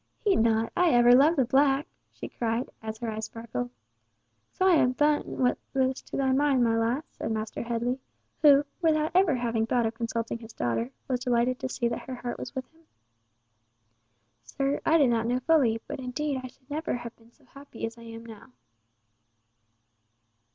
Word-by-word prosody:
"Heed 410 -3 +1
not, 225 0 +2
I 355 -1 +4
ever 240 0 +6
loved 295 +6 +5
the 265 - +3
black!" 275 +3 +3 0.3
she - - -8
cried, 230 +1 -2
as 220 0 -6
her 230 -1 -4
eyes 215 0 -4
sparkled. 220 - -5 0.8
"So 375 - -1
I 370 -2 +6
have 255 -3 +2
done 295 0 +3 0.2
what 250 -1 +1 0.2
was 260 0 +1
to - - -7
thy 265 -1 +1
mind, 270 -1 +3
my 230 -1 +2
lass?" 235 +7 0
said - - -5
Master 220 0 -3
Headley, 235 +2 -2 0.4
who, 290 -2 +7 0.2
without 310 -1 +2
ever 365 -5 +4
having 230 -2 -1
thought 240 -1 +1
of 225 - -1
consulting 230 0 -3
his 225 -1 -12
daughter, 115 0 -1 0.2
was 255 -2 0
delighted 250 0 +1
to 260 - -3
see 240 -2 -1
that 235 - -5
her 260 - -4
heart 240 0 -5
was 255 - -7
with 260 -1 -3
him. 325 - -25 1.6
"Sir, 275 - -2
I 325 - +5
did 275 -6 +4
not 230 -1 0
know 245 +1 +1
fully—but 250 -8 +1
indeed 265 +2 -3
I - - -5
should 260 +1 -21
never 310 0 -2
have 240 -1 -7
been 230 0 -23
so 280 +2 -28
happy 275 -3 -8
as 225 0 -6
I 235 - -15
am 230 0 -10
now." 230 +3 -13
250 Hz, 185 wpm, -27 LUFS, 230-275 Hz, 1.6 s, who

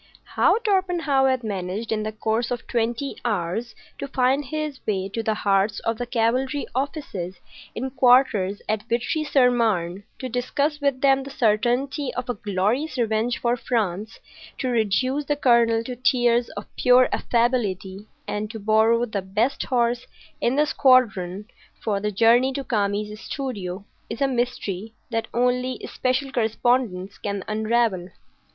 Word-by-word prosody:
How - - +4
Torpenhow 360 - +1
had 260 -2 0
managed 200 +1 -4
in 215 -1 0
the 215 0 -3
course 220 +2 -1
of 245 0 -4
twenty 235 +3 -2
hours 215 +1 -2 0.2
to - - -4
find 270 +1 +1
his 305 0 -4
way 195 -2 -1
to 225 +3 -3
the 220 -1 0
hearts 200 0 +1
of 225 -1 -2
the 245 - -3
cavalry 255 +4 0
officers 260 - -4 0.4
in 260 +3 -3
quarters 245 -7 +3
at 215 -1 0
Vitry 245 +7 0
sur 265 -4 +4
Marne, 200 -6 0
to 260 - -5
discuss 280 +5 -1
with 280 -2 0
them 270 -1 +4
the 270 - -8
certainty 245 +4 +1
of 250 - -3
a - - +1
glorious 210 +8 -1
revenge 230 0 0
for 240 0 +1
France, 220 -4 -2 0.4
to 255 - -2
reduce 250 +5 +1
the 295 - 0
colonel 235 -4 +3
to 250 +1 -6
tears 240 -1 +2
of 205 - -5
pure 250 0 +5
affability, 210 -5 0 0.2
and 210 +1 -3
to 225 - -7
borrow 220 +3 +3
the 215 -4 -3
best 215 +8 0
horse 240 -1 0 0.3
in 240 - +1
the 300 +1 +3
squadron 210 -10 +3 0.3
for 205 -3 -1
the 210 +1 -2
journey 235 +5 +4
to 275 0 -3
Kami's 210 -2 -1
studio, 200 -9 -5 0.2
is 225 - -5
a 275 - +3
mystery 225 -5 -3 0.2
that 225 -1 -1
only 250 +1 0
special 260 +1 -1
correspondents 220 -4 0
can 200 -2 -3
unravel. 220 -4 0
235 Hz, 150 wpm, -24 LUFS, 210-255 Hz, 0.4 s, pure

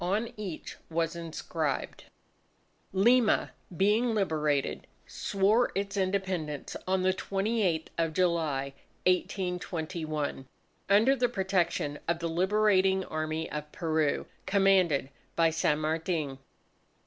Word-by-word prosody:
On 205 +6 0
each 195 -6 -6
was 165 0 -1
inscribed: 165 -3 -3 0.9
_Lima, 230 +4 +4 0.3
being 220 +4 +3
liberated, 155 -8 0 0.2
swore 210 +5 +1
its 195 0 -2
Independence 185 -6 -2
on 185 0 +1
the 185 0 +3
28th 195 -4 0
of 165 -1 +1
July, 155 -6 0 0.3
1821, 170 -6 -1 0.4
under 220 +7 +5
the 245 -2 +1
protection 185 -8 0
of 170 0 +1
the 170 0 -3
Liberating 190 +1 +3
Army 155 +1 -3
of 150 0 -5
Peru, 155 -3 0 0.2
commanded 185 -8 +3 0.2
by 165 -1 +4
San 155 -2 +1
Martin. 155 -2 -2
180 Hz, 100 wpm, -29 LUFS, 155-195 Hz, 0.9 s, under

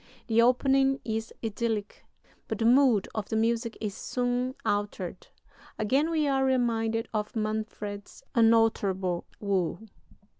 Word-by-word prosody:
The 230 -1 +3
opening 270 +2 +3
is 225 0 -3
idyllic, 220 -1 -3 0.4
but - - -3
the 225 - 0
mood 245 -4 +5
of 215 -2 -4
the - - -1
music 230 +1 0
is 210 -2 -3
soon 250 +1 -1
altered. 205 -3 -2 0.5
Again 270 +9 +1
we 310 -3 +1
are 270 -1 +2
reminded 230 -3 +1
of 210 +1 -2
Manfred's 215 -2 -4
unalterable 210 -6 +2
woe. 190 -5 0
225 Hz, 120 wpm, -28 LUFS, 210-250 Hz, 0.5 s, mood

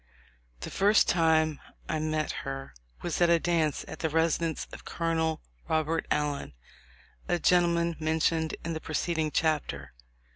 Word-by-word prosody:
The - - -6
first 205 +3 +4
time 160 -3 +3 0.3
I 155 - -1
met 155 0 -1
her 135 - -6 0.3
was 175 0 -2
at 175 - +5
a 170 - +6
dance 165 -3 0
at - - -8
the 160 - 0
residence 165 0 +1
of - - -10
Col. 160 -1 -1 0.3
Robert 160 +1 0
Allen, 145 - -1 0.7
a 175 - +2
gentleman 170 -1 +2
mentioned 160 0 +1
in 165 - -2
the 160 - -4
preceding 160 0 -1
chapter. 150 - -1
160 Hz, 140 wpm, -29 LUFS, 155-170 Hz, 0.7 s, a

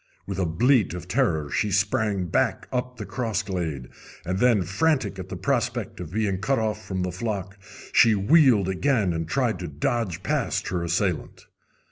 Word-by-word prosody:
With 100 -1 -4
a 90 - +1
bleat 115 - +2
of 90 0 -7
terror 85 - 0
she 105 - 0
sprang 100 0 +1
back 85 - 0
up 125 0 -2
the - - -6
cross 115 -4 -2
glade; 85 -10 -3 0.4
and 95 +2 -2
then, 115 -5 +4
frantic 100 - 0
at 95 0 -7
the 90 - -5
prospect 120 +2 -1
of 85 -3 -7
being 105 -3 0
cut 135 +7 +1
off 110 -1 -2
from 95 -2 -3
the 90 - -2
flock, 100 0 -4 0.4
she 115 -2 +6
wheeled 115 - +4
again 100 -1 +1
and 80 -1 -3
tried 120 -2 0
to 90 - -4
dodge 90 +4 -2
past - - -1
her 90 -2 -2
assailant. 85 0 -2
100 Hz, 175 wpm, -25 LUFS, 90-120 Hz, 0.4 s, she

